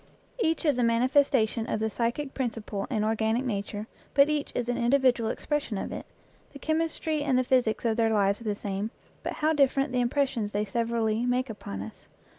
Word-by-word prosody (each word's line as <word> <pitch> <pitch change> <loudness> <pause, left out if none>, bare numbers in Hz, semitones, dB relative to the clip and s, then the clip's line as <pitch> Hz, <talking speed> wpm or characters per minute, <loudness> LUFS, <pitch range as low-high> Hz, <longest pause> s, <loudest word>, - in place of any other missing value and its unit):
Each 325 -6 +1
is 285 -5 +2
a - - +3
manifestation 235 -1 +2
of - - 0
the 220 0 -1
psychic 245 +5 -2
principle 225 -6 -3
in 215 -5 0
organic 220 +3 +1
nature, 205 -2 -3 0.3
but 280 +1 +6
each 300 -1 -1
is 245 - -1
an 245 - 0
individual 245 -2 +3
expression 295 -8 -2
of - - -4
it. - - -6 0.5
The - - -8
chemistry 315 0 -1
and 275 -3 +2
the 255 - +3
physics 245 -3 +1
of 225 -1 +1
their 225 -1 +3
lives 200 -1 +2
are - - -10
the 210 -1 0
same, 200 +1 -3 0.3
but - - -3
how 310 +1 +1
different 275 -1 +2
the 250 0 +1
impressions 245 -4 0
they 205 +1 0
severally 230 +1 0
make 250 0 0
upon 100 - -6
us 105 - -12
235 Hz, 195 wpm, -28 LUFS, 220-275 Hz, 0.5 s, but